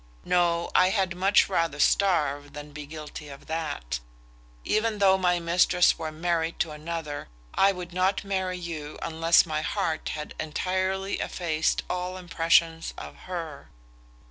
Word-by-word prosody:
No; 170 -1 +2
I 185 - +5
had 190 -3 0
much 195 +3 +4
rather 165 -6 0
starve 145 -7 +2
than 150 0 -8
be 145 0 -8
guilty 150 -1 -8
of 140 0 -11
that. 145 - -3 0.7
Even 215 0 +1
though 195 -2 +5
my 180 -2 +2
mistress 175 +1 +3
were 160 -1 -3
married 165 +1 -1
to 160 - -1
another, 150 -1 -5 0.3
I 195 - +5
would 180 -2 -7
not 185 +2 +1
marry 190 -2 -2
you 160 -4 -6
unless 165 0 +4
my 155 -2 -2
heart 160 0 -1
had 150 0 -6
entirely 185 +5 -1
effaced 160 -3 0
all 180 +1 -3
impressions 165 -2 +2
of - - -8
her. 165 -5 -6
170 Hz, 145 wpm, -27 LUFS, 155-185 Hz, 0.7 s, I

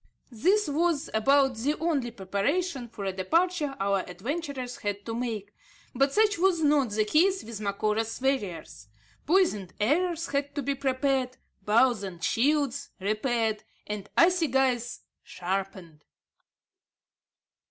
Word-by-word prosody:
This 370 - +2
was 315 0 0
about 270 +3 +3
the 280 +7 0
only 295 -7 0
preparation 240 - -2
for 210 -3 -7
a 190 - -1
departure 305 - 0
our 195 0 +1
adventurers 250 - -5
had 205 0 -4
to 225 - -4
make; 225 -4 -4 0.4
but 275 +2 +2
such 420 +1 +2
was 365 -2 +3
not 290 -4 +3
the 215 +1 0
case 370 - +3
with 220 -2 -7
Macora's 215 +2 -1
warriors. 205 - -2 0.4
Poisoned 290 - +2
arrows 335 - +1
had 280 0 -2
to 285 - -2
be 280 +2 0
prepared, 265 -1 0 0.2
bows 230 +2 +3
and 180 -4 -7
shields 280 +1 +1
repaired, 215 +2 0 0.2
and 205 -1 -6
assegais 265 -9 +2 0.2
sharpened. 185 -4 -5
250 Hz, 120 wpm, -27 LUFS, 210-295 Hz, 0.4 s, about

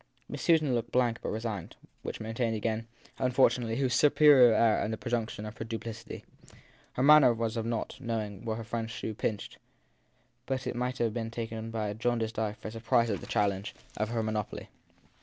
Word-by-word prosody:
Miss - - -6
Susan 155 -6 +3
looked 115 -1 -2
blank 120 -2 +2
but - - -3
resigned; 110 -5 -4 0.3
which - - -5
maintained 115 +1 -2
again, 110 +1 -2 0.3
unfortunately, 125 -2 +2
her 135 +1 +1
superior 140 -1 +6
air 110 0 +3
and 105 - -1
the 110 - -3
presumption 115 -3 -3
of 105 +1 -7
her - - -2
duplicity. 115 0 -7 0.7
Her 125 - -1
manner 145 -4 +7
was 115 0 -2
of 115 -1 -2
not 115 -1 -3
knowing 110 -4 -3
where 110 -2 -2
her 115 - -5
friend 115 0 -3
s - - -9
shoe 110 - -4
pinched; 105 0 -4 0.9
but 130 0 -2
it 125 - -3
might 125 +1 -2
have 115 -2 0
been 115 -1 -3
taken 115 -1 -5
by 110 -2 -2
a - - -3
jaundiced 115 0 -1
eye 110 -2 -1
for 110 0 -8
surprise 115 0 +1
at 100 - -3
the - - -9
challenge 100 -1 -1 0.2
of 110 0 -1
her 115 -1 -1
monopoly. 110 -1 -3
115 Hz, 195 wpm, -30 LUFS, 110-120 Hz, 0.9 s, manner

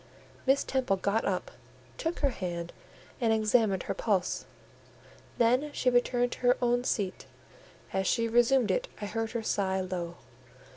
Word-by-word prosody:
Miss 270 +1 +4
Temple 260 -7 0
got 200 +4 0
up, 185 -2 -2 0.5
took 330 +1 -2
her 280 -2 +3
hand 175 -5 -5 0.5
and 230 -2 +3
examined 215 -3 +2
her - - -2
pulse; 200 -5 0 0.9
then 250 +5 +3
she 250 - +1
returned 245 0 +2
to - - -6
her 250 0 +3
own 245 0 +2
seat: 200 -6 -2 0.7
as 190 -1 0
she 230 0 +2
resumed 240 +1 +3
it, - - 0
I 210 - -4
heard 225 +2 -3
her 235 -2 -2
sigh 190 -3 0
low. 175 -2 -4
225 Hz, 150 wpm, -29 LUFS, 195-245 Hz, 0.9 s, Miss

